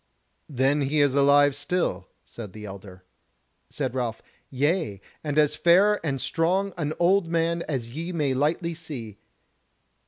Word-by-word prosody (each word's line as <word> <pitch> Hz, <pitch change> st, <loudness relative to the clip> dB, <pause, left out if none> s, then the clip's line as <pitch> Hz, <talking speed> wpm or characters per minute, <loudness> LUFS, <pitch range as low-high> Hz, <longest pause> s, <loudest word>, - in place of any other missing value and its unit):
"Then 135 Hz, +1 st, +1 dB
he 145 Hz, +2 st, 0 dB
is 145 Hz, -2 st, +3 dB
alive 140 Hz, 0 st, +5 dB
still," 145 Hz, -, -2 dB, 0.2 s
said 105 Hz, -5 st, -9 dB
the 105 Hz, -1 st, -9 dB
elder. 95 Hz, -2 st, -10 dB, 0.7 s
Said -, -, -3 dB
Ralph: 120 Hz, -3 st, -3 dB, 0.3 s
"Yea, 145 Hz, -, 0 dB, 0.2 s
and 150 Hz, -1 st, -3 dB
as 150 Hz, 0 st, +3 dB
fair 190 Hz, +6 st, +4 dB
and 140 Hz, -4 st, -2 dB
strong 185 Hz, +7 st, 0 dB
an 155 Hz, -3 st, -2 dB
old 180 Hz, +1 st, +3 dB
man 170 Hz, 0 st, 0 dB
as 125 Hz, -6 st, -3 dB
ye 165 Hz, +7 st, -5 dB
may 150 Hz, -6 st, 0 dB
lightly 160 Hz, +5 st, 0 dB
see." 130 Hz, -, -8 dB
145 Hz, 145 wpm, -25 LUFS, 130-170 Hz, 0.7 s, alive